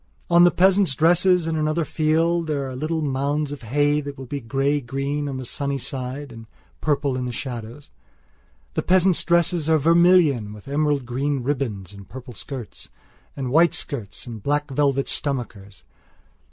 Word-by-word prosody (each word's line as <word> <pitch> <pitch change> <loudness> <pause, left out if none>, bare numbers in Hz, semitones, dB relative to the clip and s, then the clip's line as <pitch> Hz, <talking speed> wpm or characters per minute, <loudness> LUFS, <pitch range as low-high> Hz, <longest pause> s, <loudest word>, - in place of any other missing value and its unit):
Or 170 - +5
the 175 0 +8
peasants' 185 -3 +3
dresses 175 +3 +3
in 165 0 -1
another 155 +1 0
field 165 +2 +1
where 150 - 0
there 135 - -4
are - - -7
little 155 +4 -2
mounds 140 +1 -1
of 145 - -7
hay 145 +5 +1
that 145 -1 -7
will 135 - -8
be 140 +3 -4
grey 135 +5 0
green 140 +3 -3
on 135 - -4
the 130 - -6
sunny 140 +3 -2
side 135 +1 -5
and 115 -1 -11 0.3
purple 140 -3 0
in 125 0 -2
the - - -3
shadowsthe 120 +1 -7 1.0
peasants' 185 -1 +3
dresses 170 -2 +2
are 160 - +5
vermilion 165 - +4
with 105 +4 -13
emerald 145 -1 0
green 135 +2 -2
ribbons 115 -9 -3
and 100 -1 -13
purple 130 -1 -9
skirts 125 +1 -8 0.5
and 130 -3 -4
white 165 +3 +4
shirts 105 -7 -5
and 115 -4 -8
black 145 +3 -1
velvet 135 0 +1
stomachers. 110 - -4
140 Hz, 165 wpm, -23 LUFS, 125-155 Hz, 1.0 s, the